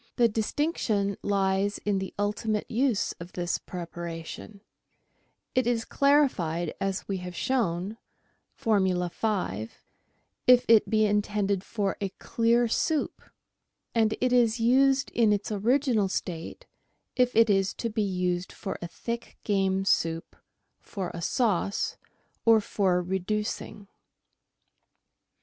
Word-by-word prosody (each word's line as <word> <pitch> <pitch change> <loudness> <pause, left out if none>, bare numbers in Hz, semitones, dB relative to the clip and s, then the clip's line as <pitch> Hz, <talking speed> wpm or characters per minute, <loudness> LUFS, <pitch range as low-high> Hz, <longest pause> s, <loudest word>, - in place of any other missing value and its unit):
The 240 -2 +5
dis 220 -1 -2
tinction 215 -10 0
lies 195 0 +1
in 205 -2 +1
the 190 - -5
ultimate 210 +1 -1
use 240 -2 +1
of 170 +1 -9
this 175 -1 -1
preparation; 170 +3 -7 0.9
it 255 -2 +2
is 235 -2 0
clari 285 +1 +4
fied, 170 - -3
as 195 0 -2
we 195 - -2
have 180 -1 -7
shown 205 -5 -1 0.6
(Formula 190 -5 +1
5), 175 - -2 0.7
if 250 0 +7
it 225 -2 +5
be 215 -1 +3
intended 205 -2 0
for 200 -3 -2
a 200 - -1
clear 235 +1 +2
soup, 305 +6 -1 0.7
and 220 -2 +2
it 250 0 +2
is 235 -2 +3
used 270 +4 +3
in 230 -3 +3
its 205 +1 -1
original 225 0 +2
state 170 -3 -5 0.5
if 250 -1 +2
it 230 0 +6
is 195 -2 +2
to 230 - -3
be 215 0 -1
used 180 -2 -1
for 195 - -6
a 170 - -4
thick 235 +7 -6
game 195 -2 +1
soup, 165 -3 0 0.4
for 190 -4 -5
a 170 - -6
sauce, 200 0 0 0.5
or 225 -1 +6
for 185 -4 +1
reducing. 200 +2 -3
205 Hz, 125 wpm, -27 LUFS, 185-230 Hz, 0.9 s, if